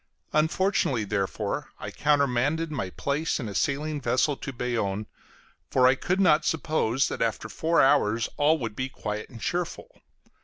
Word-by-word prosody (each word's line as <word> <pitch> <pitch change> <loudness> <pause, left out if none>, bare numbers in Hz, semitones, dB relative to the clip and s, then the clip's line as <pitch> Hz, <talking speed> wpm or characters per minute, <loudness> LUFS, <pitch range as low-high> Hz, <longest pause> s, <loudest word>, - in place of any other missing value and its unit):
Unfortunately, 155 - +1
therefore, 100 -2 -2
I - - -6
countermanded 145 +2 +1
my 125 -11 -3
place 145 - -1
in 120 - -4
a 100 - -5
sailing 145 +5 -1
vessel 130 +4 +1
to 135 - -6
Bayonne, 115 -5 -2 0.6
for 130 -1 +3
I 130 - +7
could 180 +8 -1
not 160 -5 +5
suppose 150 -5 +1
that - - -5
after 110 -1 -1
four 160 - +2
hours 115 -5 +3
all 150 +2 +3
would 115 -7 -5
be 130 +3 -3
quiet 105 -4 -5
and 120 - -11
cheerful. 180 - -4
135 Hz, 155 wpm, -26 LUFS, 115-155 Hz, 0.6 s, I